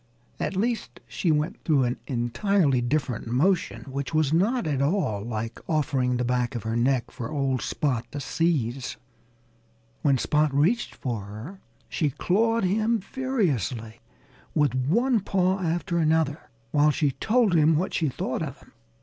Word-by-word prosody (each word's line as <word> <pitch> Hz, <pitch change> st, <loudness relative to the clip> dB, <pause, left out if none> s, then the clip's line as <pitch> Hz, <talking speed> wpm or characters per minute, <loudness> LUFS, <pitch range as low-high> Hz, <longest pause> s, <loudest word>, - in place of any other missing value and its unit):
At -, -, -2 dB
least, 230 Hz, +4 st, -2 dB
she 170 Hz, -, 0 dB
went 155 Hz, +6 st, -1 dB
through 145 Hz, -5 st, +3 dB
an 120 Hz, 0 st, -1 dB
entirely 135 Hz, -, +1 dB
different 125 Hz, -2 st, -1 dB
motion, 160 Hz, +11 st, +1 dB
which 140 Hz, +2 st, -4 dB
was 155 Hz, -2 st, +2 dB
not 210 Hz, +7 st, +2 dB
at 145 Hz, -4 st, 0 dB
all 140 Hz, -, +1 dB
like 115 Hz, 0 st, -4 dB
offering 135 Hz, -5 st, +1 dB
the 125 Hz, -, -1 dB
back 125 Hz, 0 st, 0 dB
of 115 Hz, -, -4 dB
her 110 Hz, 0 st, -2 dB
neck 125 Hz, +1 st, +1 dB
for 115 Hz, -, -6 dB
old 135 Hz, -4 st, 0 dB
Spot 130 Hz, -7 st, -1 dB
to 145 Hz, -, -4 dB
seize. 135 Hz, -4 st, -1 dB, 1.0 s
When 140 Hz, -3 st, +3 dB
Spot 150 Hz, +3 st, +2 dB
reached 185 Hz, +12 st, +2 dB
for 115 Hz, -6 st, -4 dB
her 110 Hz, -, -9 dB, 0.3 s
she 155 Hz, -, 0 dB
clawed 225 Hz, -, +1 dB
him 220 Hz, +5 st, +2 dB
furiously, 150 Hz, -, -2 dB, 0.6 s
with 150 Hz, -3 st, +3 dB
one 220 Hz, -, +2 dB
paw 190 Hz, -1 st, +1 dB
after 170 Hz, 0 st, -1 dB
another, 160 Hz, -2 st, +1 dB, 0.2 s
while 150 Hz, +1 st, +4 dB
she 150 Hz, -1 st, +1 dB
told 220 Hz, -, +2 dB
him 160 Hz, -1 st, +5 dB
what 180 Hz, +5 st, -1 dB
she 160 Hz, -4 st, +1 dB
thought 130 Hz, +2 st, -3 dB
of 140 Hz, -4 st, -4 dB
him. -, -, -20 dB
150 Hz, 155 wpm, -26 LUFS, 125-185 Hz, 1.0 s, him